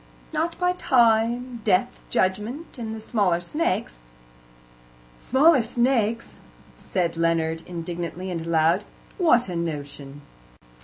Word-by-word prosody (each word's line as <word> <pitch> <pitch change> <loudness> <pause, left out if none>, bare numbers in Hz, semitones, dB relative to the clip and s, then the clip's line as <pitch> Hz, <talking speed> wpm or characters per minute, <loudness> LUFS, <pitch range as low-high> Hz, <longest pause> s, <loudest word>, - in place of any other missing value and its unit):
"Not 325 +2 -1
by 360 0 +1
Time, 240 -4 +2
Death, 205 +4 +1
Judgment, 220 - -1
and 220 -1 -4
the - - -7
smaller 205 -6 +1
snakes." 175 - -2 1.2
"Smaller 275 +1 +4
snakes!" 235 -1 0 0.4
said 170 -3 -2
Leonard 165 -1 +1
indignantly 175 +1 -5
and 165 -2 -3
aloud. 165 +4 +3 0.4
"What 245 - +4
a 180 - -5
notion!" 145 -3 -5
210 Hz, 105 wpm, -24 LUFS, 170-245 Hz, 1.2 s, Smaller